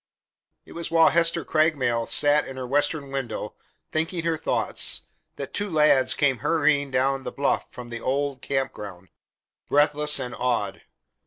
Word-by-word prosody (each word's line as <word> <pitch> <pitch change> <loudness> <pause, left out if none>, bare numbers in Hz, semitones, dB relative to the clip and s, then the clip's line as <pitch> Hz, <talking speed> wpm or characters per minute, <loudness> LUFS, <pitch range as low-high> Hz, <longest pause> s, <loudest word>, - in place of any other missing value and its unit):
It - - -16
was 170 0 -6
while 165 -1 +5
Hester 170 0 +1
Craigmile 140 -8 +1
sat 145 0 +3
in 135 - -8
her 130 - -4
western 145 +1 0
window, 135 -5 -4 0.4
thinking 165 +2 -2
her 165 -1 0
thoughts, 155 - +1 0.3
that - - -7
two 205 0 0
lads 150 -5 +4
came 135 -4 +1
hurrying 145 0 +1
down 135 +1 0
the - - -6
bluff 140 - -1
from 120 -1 -10
the 115 -1 -6
old 140 0 -2
camp 135 -1 -2
ground, 95 -3 -10 0.6
breathless 150 0 +2
and 125 -3 -4
awed. 115 -6 -2
140 Hz, 155 wpm, -24 LUFS, 130-155 Hz, 0.6 s, while